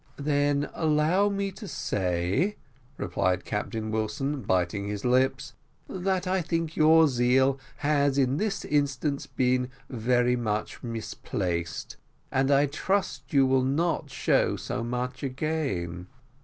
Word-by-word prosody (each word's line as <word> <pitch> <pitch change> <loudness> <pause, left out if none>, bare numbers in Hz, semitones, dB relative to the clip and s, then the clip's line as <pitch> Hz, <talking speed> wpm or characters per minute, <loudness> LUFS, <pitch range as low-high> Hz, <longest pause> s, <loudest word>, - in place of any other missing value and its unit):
"Then 145 0 +1
allow 160 +6 +2
me 200 -1 -2
to 195 +2 -9
say," 95 - 0 0.4
replied 90 -1 0
Captain 110 +1 -3
Wilson, 120 +6 -2
biting 95 0 0
his 105 +1 -4
lips, 130 +1 +1 0.3
"that 185 0 -1
I 185 0 +1
think 165 -1 -1
that - - -16
your 160 +1 +6
zeal 130 +1 +3 0.2
has 145 -2 +2
in 135 0 +2
this 210 +2 -2
instance 145 -1 0
been 125 0 +1 0.2
very 125 +1 +2
much 110 -3 -2
misplaced, 90 -7 -4 0.3
and 135 +1 +2
I 140 0 +5
trust 190 +9 -2
you 140 -3 +5
will 130 0 +3
not 150 +7 0
show - - +2
so - - -4
much 125 +2 -3
again." 130 - -2
135 Hz, 130 wpm, -27 LUFS, 110-155 Hz, 0.4 s, your